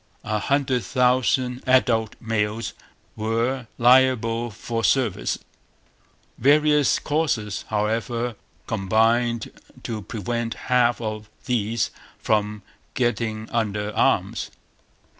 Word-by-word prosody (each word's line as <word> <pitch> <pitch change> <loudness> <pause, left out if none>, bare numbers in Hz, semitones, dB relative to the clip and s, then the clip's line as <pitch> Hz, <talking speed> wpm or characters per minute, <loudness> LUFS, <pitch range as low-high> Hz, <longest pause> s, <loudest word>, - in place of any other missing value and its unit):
A 110 0 -1
hundred 130 0 +1
thousand 125 0 +1
adult 120 -4 +3
males 110 0 -2 0.4
were 115 +3 -1
liable 120 -2 +4
for 115 +1 -4
service. 110 +1 +1 1.0
Various 150 +1 +4
causes, 145 -10 -1
however, 115 +3 -1 0.3
combined 115 +3 +1 0.3
to 110 -2 -4
prevent 115 +2 -3
half 125 -1 +2
of 110 -2 -5 0.2
these 115 -2 0 0.3
from 105 -1 0 0.3
getting 110 -3 -1
under 105 -2 -1
arms. - - +1
115 Hz, 85 wpm, -23 LUFS, 110-125 Hz, 1.0 s, liable